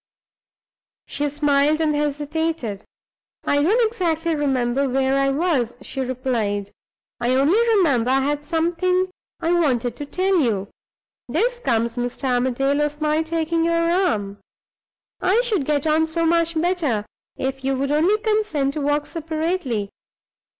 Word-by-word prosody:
She 290 0 -2
smiled 290 +1 +2
and 310 -2 +1
hesitated. 295 -5 -2 0.6
"I 285 - +2
don't 440 +10 +3
exactly 335 -6 -1
remember 270 -2 0
where 265 +1 +1
I 275 0 +2
was," 275 -5 0
she 265 - -5
replied, 235 -6 -2 0.5
"I 245 +2 +1
only 290 - +3 0.2
remember 265 - +2
I 270 +1 +3
had 290 +2 -1
something 350 +3 0 0.3
I 330 - +1
wanted 255 -9 +1
to 290 - -6
tell 370 +3 +1
you. 210 -8 0 0.6
This 475 - 0
comes, 235 - 0
Mr. 245 +3 -3
Armadale, 260 +3 +1
of 295 0 -2
my 305 0 +1
taking 330 0 -1
your 335 0 +2
arm. 210 - 0 0.8
I 385 +5 +3
should 425 - 0
get 290 0 0
on 315 +1 +2
so 330 +1 0
much 335 0 +2
better, 315 - 0 0.3
if 265 0 -3
you 270 0 0
would 275 +1 -1
only 335 +8 +3
consent 425 -11 0
to 305 - -3
walk 290 +1 0
separately. 315 - -2
295 Hz, 140 wpm, -22 LUFS, 260-335 Hz, 0.8 s, don't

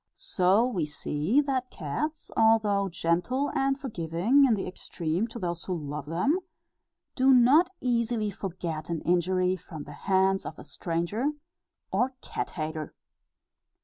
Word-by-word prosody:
So 205 - +2
we 185 -12 -1
see 150 - +1
that 260 -3 -1
cats, 295 - -4
although 215 -3 +3
gentle 180 - 0
and 270 -1 +1
forgiving 215 - +2
in 240 -4 +4
the 195 - -3
extreme 180 +2 -2
to 235 - -9
those 175 -4 -3
who 185 - -2
love 145 -1 -5
them, 230 - +1 0.8
do 265 +1 +5
not 265 +7 +6
easily 235 -3 0
forget 170 -5 -5
an 165 -2 -2
injury 180 +1 +2
from 165 -4 -9
the 145 - -10 0.2
hands 190 0 +3
of - - -7
a - - -10
stranger 190 - -2 0.6
or 250 +7 +1
cat - - -4
hater. 155 -1 -5
195 Hz, 140 wpm, -28 LUFS, 170-250 Hz, 0.8 s, not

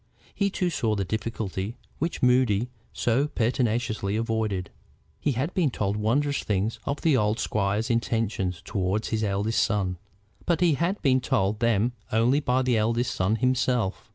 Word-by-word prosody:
He 200 -1 +1
too 180 -2 -1
saw 115 -8 0
the 100 -2 -1
difficulty 110 0 -3 0.2
which 165 -2 -2
Moody 125 -3 +3 0.2
so 125 +5 +1
pertinaciously 115 -5 0
avoided. 110 -4 -1 0.5
He 145 - 0
had 135 +9 -2
been 170 -6 +2
told 105 -4 -1
wondrous 135 +7 +1
things 105 +2 -1
of 140 - -2
the 160 -4 +3
old 105 -2 +2
squire's 105 +3 0
intentions 110 -6 -1
toward 95 +3 -1
his 110 -1 -1
eldest 105 +2 +1
son, 95 -3 0 0.5
but 170 -2 +2
he 175 -3 +4
had 170 +7 0
been 130 -3 +3
told 100 -1 0
them 115 0 +2 0.2
only 120 +6 +3
by 130 -2 +1
that 130 - 0
eldest 115 +3 +1
son 95 +4 +1
himself. 125 -4 0
115 Hz, 155 wpm, -26 LUFS, 105-130 Hz, 0.5 s, he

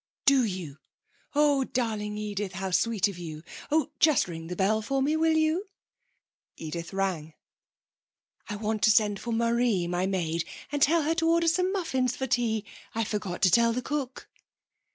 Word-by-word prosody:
'Do 275 -2 +5
you? 180 -9 -4 0.6
Oh, 290 -2 +4
darling 215 -5 -2
Edith, 205 -2 -4
how 190 +1 -4
sweet 220 +2 +2
of 195 -3 -7
you. 155 -2 -7 0.3
Oh, 310 -2 +1
just 310 - +4
ring 165 -2 -7
the 180 - -5
bell 210 +4 +1
for 270 +6 -1
me, 300 +3 +1
will 320 0 +3
you?' 320 +6 +1 0.9
Edith 165 +1 -6
rang. 185 -6 -2 1.1
'I 210 - -3
want 215 0 -2
to - - +5
send 210 -2 +3
for 235 - -5
Marie, 230 -4 +1
my 180 +2 -1
maid, 170 -4 -1 0.3
and 290 -1 -2
tell 320 +3 +4
her 315 +2 +1
to 330 0 +1
order 335 0 +3
some 365 +3 +2
muffins 265 - -1
for 265 - -3
tea. 230 -4 0 0.3
I 225 - +1
forgot 205 -4 -4
to 185 - +6
tell 235 +2 +4
the 250 +1 -3
cook.' 275 -3 -4
220 Hz, 175 wpm, -27 LUFS, 190-275 Hz, 1.1 s, to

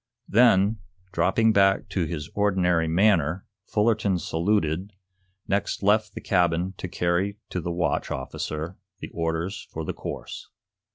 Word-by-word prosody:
Then, 110 -2 +4 0.3
dropping 95 +6 +3
back 95 -1 +3
to 90 -4 0
his 75 -3 -5
ordinary 90 -5 +2
manner, 90 -1 +2 0.2
Fullerton 105 -3 +2
saluted, 85 +2 0 0.5
next 100 0 -1
left 105 +2 +2
the - - -6
cabin 90 -1 +1
to - - -5
carry 90 +4 0
to 90 - -2
the 85 - -3
watch 85 -2 -1
officer 75 +6 -4 0.2
the - - -7
orders 85 +3 -3
for 80 0 -5
the - - -3
course. - - -7
90 Hz, 130 wpm, -25 LUFS, 85-100 Hz, 0.5 s, Then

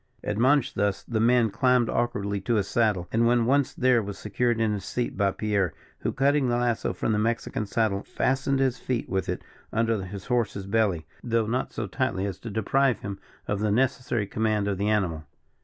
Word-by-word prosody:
Admonished 130 +6 +2
thus, 100 0 0
the 115 -2 -2
man 115 -1 +4
climbed 125 +1 +3
awkwardly 100 -4 -1
to 115 +4 0
his 100 -3 +1
saddle, 105 -6 +1
and 115 +1 +3
when 120 -1 +3
once 140 +2 +2
there 125 -2 +3
was 100 -1 -6
secured 115 +3 0
in 110 -2 +2
his 100 -2 -4
seat 120 +5 -3
by 100 -1 +2
Pierre, 100 -3 -1 0.2
who, - - -1
cutting 140 0 +2
the 120 - +2
lasso 120 -1 0
from - - -2
the 105 - +1
Mexican 115 +1 -1
saddle, 105 -2 0
fastened 135 +4 0
his 130 -2 +1
feet 125 -3 -2
with 95 0 -2
it - - -3 0.3
under 115 -2 +1
his 95 0 -7
horse's 115 -5 -1
belly, 100 -5 +1 0.2
though 115 -2 +1
not 125 +4 -1
so 110 - -3
tightly 100 -2 -1
as 95 -3 -4
to 115 - -7
deprive 120 +5 +1
him 100 -1 -5 0.3
of 100 - -1
the 105 0 +1
necessary 120 -1 +1
command 110 0 0
of 100 -2 -1
the 105 +1 +1
animal. 90 -7 0
110 Hz, 200 wpm, -26 LUFS, 100-120 Hz, 0.3 s, man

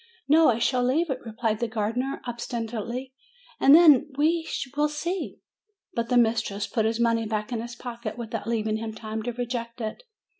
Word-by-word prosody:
"No; 315 +3 +6
I 230 - +2
shall 250 +1 +1
leave 290 +6 +1
it," 260 - -2
replied 225 -1 -2
the 235 - 0
gardener, 230 +5 -2
ob 240 -1 -4
stinately; 235 +2 -4 0.5
"and 275 +2 +8
then 315 -5 +7
we 320 +2 +1 0.3
will 300 +1 +2
see." 340 +5 -3 0.6
But 235 0 -2
the 250 - +3
mistress 220 -3 +1
put 220 -1 0
his 225 +1 0
money 230 -1 +2
back 210 +1 -3
in 230 -2 -2
his 240 +1 -7
pocket, 235 -2 -6
without 225 -2 -5
leaving 220 -2 0
him 220 0 -5
time 220 0 -5
to 245 +3 -3
reject 240 -1 -4
it. 220 - -4
235 Hz, 185 wpm, -26 LUFS, 225-255 Hz, 0.6 s, and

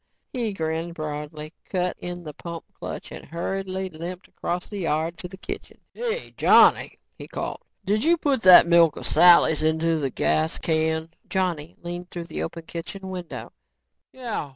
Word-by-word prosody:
He 235 -4 -1
grinned 165 -1 -3
broadly, 150 0 -6 0.2
cut 180 -1 0
in 175 0 -5
the 150 -2 -7
pump 170 +2 -7
clutch - - -7
and - - -8
hurriedly 190 +2 -3
limped 170 +3 -7
across 175 +1 -3
the 205 - -6
yard 165 -1 0
to 180 - -5
the 190 +1 -11
kitchen. - - -7 0.2
"Hey, 475 0 -3
Johnny," - - +5 0.2
he - - -8
called, - - -5 0.2
"did 210 +2 +1
you 340 +2 +4
put 280 -6 +1
that 185 -4 +9
milk 170 -2 +5
o' - - -7
Sally's 170 -3 +6
into 160 0 +1
a 135 - +1
gas 155 +5 +1
can?" 160 0 0 0.2
Johnny 175 -4 -1
leaned 175 +1 -6
through 175 -2 -6
the - - -5
open 165 - -5
kitchen 190 +4 -7
window. 180 -2 -7
170 Hz, 160 wpm, -25 LUFS, 160-190 Hz, 0.2 s, that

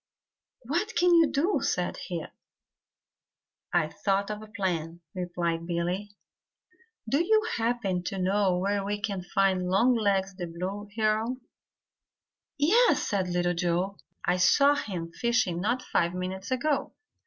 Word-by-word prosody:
"What 345 - -2
can 350 +1 +4
we 335 -2 +6
do?" 330 +10 +1
said - - -1
he. - - -4 1.5
"I've 165 -3 +1
thought 200 0 +1
of 210 0 -5
a 215 - -10
plan," 175 -6 -3
replied 175 -2 -2
Billy. 175 +4 -2 1.0
"Do 280 +9 +2
you 435 +4 +3
happen 225 -6 0
to 195 - -3
know 190 0 +2
where 200 +2 0
we 205 +1 -2
can 200 -3 -3
find 185 0 +1
Longlegs 200 -2 +2
the 175 -3 -4
Blue 190 +5 -5
Heron?" 220 +3 0 1.2
"Yes," 410 +13 +4
said 190 -4 0
Little 175 0 +1
Joe. 180 +3 -1 0.3
"I 180 - +2
saw 280 +10 +5
him 175 -11 -4
fishing 210 -5 0
not 240 +6 0
five 170 +1 0
minutes 185 +1 -4
ago." 270 +3 0
195 Hz, 130 wpm, -28 LUFS, 180-235 Hz, 1.5 s, we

